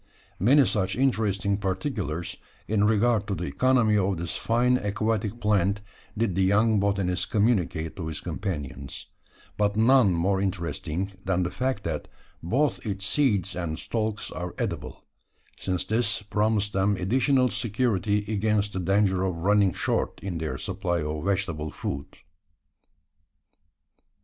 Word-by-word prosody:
Many 135 +8 +5
such 95 -4 0
interesting 105 -6 +1
particulars, 95 - -3 0.3
in 105 -1 +2
regard 110 0 +2
to 100 - -1
the 85 - -4
economy 110 - +3
of 95 -2 +1
this 85 +1 -3
fine 125 +2 +2
aquatic 110 +1 -1
plant, 100 -2 +1 0.4
did 110 -3 +1
the 95 - +1
young 105 +3 +3
botanist 95 -3 0
communicate 95 -8 +1
to 85 -4 -4
his 80 - -4
companions; 75 -7 -5 0.5
but 105 0 +1
none 115 -2 +5
more 95 +3 +1
interesting 90 0 -2
than 95 -1 +1
the 90 - -2
fact 130 -5 -2
that 80 -3 -3 0.3
both 130 - 0
its 100 -2 -3
seeds 105 -7 +1
and 85 -3 -3
stalks 110 +1 -3
are 90 0 -5
edible: - - -4 0.5
since 90 -2 -2
this 115 -2 0
promised 105 0 0
them 95 +1 +2
additional 125 +7 +2
security 105 -3 0
against 105 -1 0
the 95 - -2
danger 95 +1 +2
of 95 -2 -1
running 100 +2 +3
short - - -1
in 90 -4 -3
their 80 -1 -3
supply 85 -4 -2
of 75 0 -3
vegetable 95 -6 -1
food. 70 -1 -5
100 Hz, 135 wpm, -26 LUFS, 90-110 Hz, 0.5 s, Many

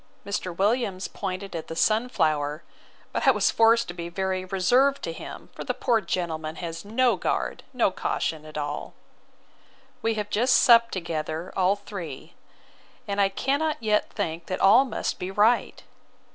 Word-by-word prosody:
Mr. 185 -3 -3
Williams 200 -2 0
pointed 195 -1 -5
at 160 - -5
the 165 - -6
sunflower, 160 - +1 0.5
but - - -1
I - - +9
was - - +3
forced 230 +1 +4
to 175 - -5
be 170 -1 -6
very 190 +1 -2
reserved 245 +10 +2
to 165 - -3
him; - - -9
for - - -7
the - - -2
poor 235 -4 +1
gentleman 160 -4 -3
has 165 -1 -6
no 240 +4 +2
guard, - - -2
no 245 -6 +2
caution 160 -3 -2
at 155 0 -9
all. 145 0 -4 1.1
We 225 0 0
have 210 -1 -4
just 245 +4 +3
supped 235 -1 +6
together, 165 -1 -4
all 190 +1 +3
three: 190 -9 -8 0.7
and 200 0 0
I 195 - +4
cannot 285 +9 0
yet 215 -2 +1
think 165 -5 -4
that 185 - -3
all 230 +8 +6
must 245 - -3
be 180 - -4
right. 210 +5 +2
195 Hz, 160 wpm, -26 LUFS, 170-225 Hz, 1.1 s, I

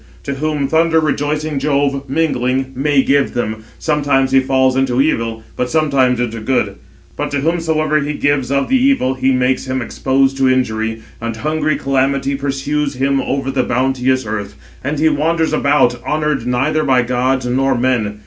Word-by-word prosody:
To 140 - -3
whom 150 0 -1
thunder 160 +2 +3
rejoicing 150 0 -1
Jove, 140 -1 0
mingling, 135 -3 0
may 140 0 +2
give 140 -2 +1
them, 110 -3 -2 0.2
sometimes 145 -3 +1
he 135 - +5
falls 130 0 +2
into 130 -1 +1
evil, 115 -6 0
but 125 - -2
sometimes 135 -5 +2
into 115 -2 -2
good; 110 -4 -1 0.4
but - - -3
to 140 -1 -2
whomsoever 155 -1 +1
he 150 +1 -2
gives 145 -3 0
of 140 0 +1
the 260 -1 +2
evil, 270 - +2
he 130 0 +1
makes 130 0 0
him 130 0 -1
exposed 135 +2 0
to 135 -1 +3
injury; 110 -3 -1 0.2
and 115 -1 -3
hungry 155 +4 0
calamity 135 0 0
pursues 140 +1 -2
him 135 +1 +1
over 135 -1 -2
the 135 -1 +1
bounteous 130 +1 0
earth; 105 -1 -4 0.3
and 145 +3 -2
he 155 +2 +3
wanders 160 +2 +1
about, 130 -4 +2
honoured 150 -5 -1
neither 145 +5 +1
by 130 -3 +3
gods 125 +1 0
nor 135 +2 +1
men. 120 -5 0
135 Hz, 165 wpm, -17 LUFS, 125-150 Hz, 0.4 s, he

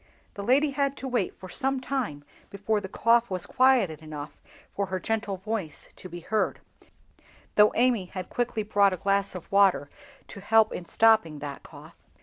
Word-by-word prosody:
The 200 - -7
lady 275 +7 +3
had 275 0 -1
to 265 - -5
wait 245 -7 -1
for 185 - -9
some 270 +8 -1
time 250 - -3 0.3
before 205 +2 -1
the 190 - -7
cough 235 +3 +2
was 185 -2 -2
quieted 245 - +2
enough 150 -1 -8 0.4
for 200 -1 -2
her 185 0 -3
gentle 215 -1 -2
voice 195 -4 -5
to 185 - -10
be 175 0 -8
heard, 215 +5 -1 0.9
though 210 0 +6
Amy 240 -5 +2
had 185 0 -7
quickly 240 -3 -2
brought 200 -2 +3
a - - -4
glass 195 +1 0
of 180 - -9
water 195 -7 +3 0.4
to 200 - -9
help 220 +2 +3
in 175 - -6
stopping 220 -7 +3
that 145 -1 -7
cough. - - -14
200 Hz, 175 wpm, -27 LUFS, 185-235 Hz, 0.9 s, though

